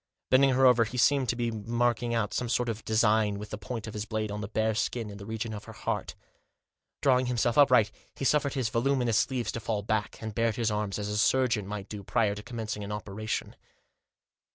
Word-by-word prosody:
Bending 135 +1 +5
over 125 -2 +5
her, 110 - -5
he 125 - -6
seemed 130 +1 +3
to 120 - +1
be 120 -1 -1
marking 120 +2 0
out 105 -3 -1
some 125 - -2
sort 120 +1 +1
of 115 -1 -4
design 110 -2 +2
with 105 +1 -8
the 105 - -4
point 110 +1 -5
of 110 - -7
his 105 0 -4
blade 110 -2 -2
on 105 +1 -4
the 100 - -4
bare 110 +1 0
skin, 110 0 -2
in 100 - -9
the 100 - -9
region 110 0 -4
of 105 0 -7
the - - -10
heart - - -3 0.9
Drawing 130 -2 +4
himself 120 -1 +1
upright 125 -7 +5 0.2
he 135 - -4
suffered 145 0 +2
his 130 -5 0
voluminous 120 -1 +2
sleeves 125 -5 -1
to - - -4
fall 110 -2 -2
back, 110 0 -2
and 110 -1 -5
bared 115 0 +1
his 115 -2 0
arms, 105 -2 -2
as 105 -1 -3
a 105 0 -1
surgeon 120 -4 +2
might 105 -1 -5
do 105 -2 -7
prior 105 +1 +1
to 105 - -7
commencing 110 -2 -5
an 100 - -6
operation. 105 +1 -4
110 Hz, 225 wpm, -29 LUFS, 105-120 Hz, 0.9 s, Bending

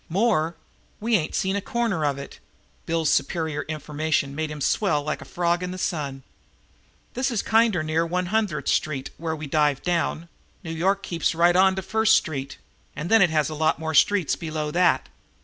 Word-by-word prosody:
"More? 170 -4 +1 0.4
We 225 +2 +1
ain't 160 -6 -1
seen 190 -1 0
a 200 - -1
corner 225 -7 -1
of 140 -2 0
it!" 140 - -9 0.5
Bill's 165 -2 +1
superior 160 -2 0
information 150 -2 -2
made 155 +1 -3
him 150 0 -6
swell 150 -1 +1
like 150 +1 -3
a - - -9
frog 175 0 0
in 180 - -3
the 185 - -6
sun. 145 -7 -3 0.9
"This 260 +2 0
is 230 -5 -1
kinder 220 -6 +3
near 155 +1 +1
One 180 +2 -1
Hundredth 200 -10 0
Street 140 -4 -1
where 160 -1 -3
we 155 0 -6
dived 145 -1 +1
down. 170 -1 -1 0.4
New 160 - -5
York 195 +4 0
keeps 170 -1 -1
right 175 +1 +4
on 190 +1 +5
to 190 - -4
First 220 +3 +3
Street, 140 -4 -2 0.4
and 165 +6 -5
then 225 -1 +6
it 190 - +5
has 155 -2 +1
a 155 - -5
lot 155 +1 +1
more 160 0 -4
streets 185 +2 +3
below 155 -2 -4
that. 175 +2 +2
165 Hz, 190 wpm, -24 LUFS, 155-190 Hz, 0.9 s, then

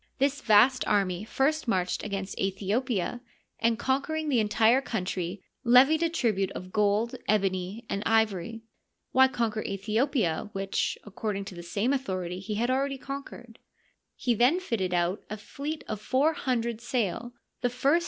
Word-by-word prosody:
This 280 +1 +1
vast 235 +4 +5
army 195 -2 +1
first 275 +6 0
marched 185 -5 0
against 195 -2 -4
Aethiopia 205 +4 -1 0.2
(!), - - -45
and, 230 0 +2
conquer 270 +5 0
ing 315 -1 -2
the 255 -5 +3
entire 220 +4 +4
country, 185 -5 -3 0.2
levied 265 +6 +6
a 335 - +2
tribute 215 - 0
of 185 0 -8
^old, 210 +2 +2
ebony, 195 +1 0
and 200 - -2
ivory. 220 -1 +1 0.5
(Why 265 +1 +6
conquer 230 -4 -1
Aethiopia, 210 - 0
which, 195 0 -1
according 205 -1 -4
to 195 - -8
the. 175 - -8
same 205 +9 0
authority, 185 -9 -3
he 210 +3 -4
had 240 +4 +1
already 275 +1 0
conquered.^) 255 -4 -8 0.6
He 245 - +1
then 250 - +4
fitted 220 - -2
out 175 +3 0
a 215 - -4
fleet 285 +9 -6
of 215 -1 -4
four 275 +8 +2
hundred 235 -5 -2
sail, 240 -1 -2 0.3
the 245 - +2
first 275 +6 +2
225 Hz, 155 wpm, -28 LUFS, 195-260 Hz, 0.6 s, levied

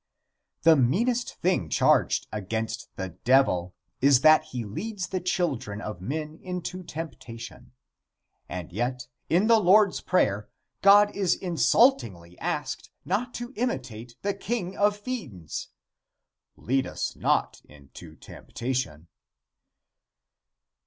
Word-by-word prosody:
The 165 +1 +7
meanest 225 - +1
thing 170 - 0
charged - - +3
against 110 +2 -4
the 95 -1 -4
Devil 115 -9 +3 0.3
is 135 -1 +5
that 155 +2 +6
he 120 -3 -5
leads 190 - -5
the 185 - -1
children 175 - -2
of 105 -5 -6
men 155 - -4
into 180 0 -5
temptation, 125 -10 -9 0.8
and 90 -2 -6
yet, 125 +4 -2 0.2
in 180 +5 +3
the 230 0 +5
Lord's 200 +1 +4
Prayer, 105 - +1 0.3
God 205 +1 +6
is 195 -3 +2
insultingly 120 - +2
asked - - -3 0.2
not 245 +4 -1
to 240 +2 -6
imitate 125 - -4
the 200 0 0
king 200 -2 -3
of 205 0 +2
fiends. 145 - -6 0.9
"Lead 135 +2 0
us - - -4
not - - 0
into 70 -2 -14
temptation." 115 - -5
145 Hz, 110 wpm, -26 LUFS, -, 0.9 s, The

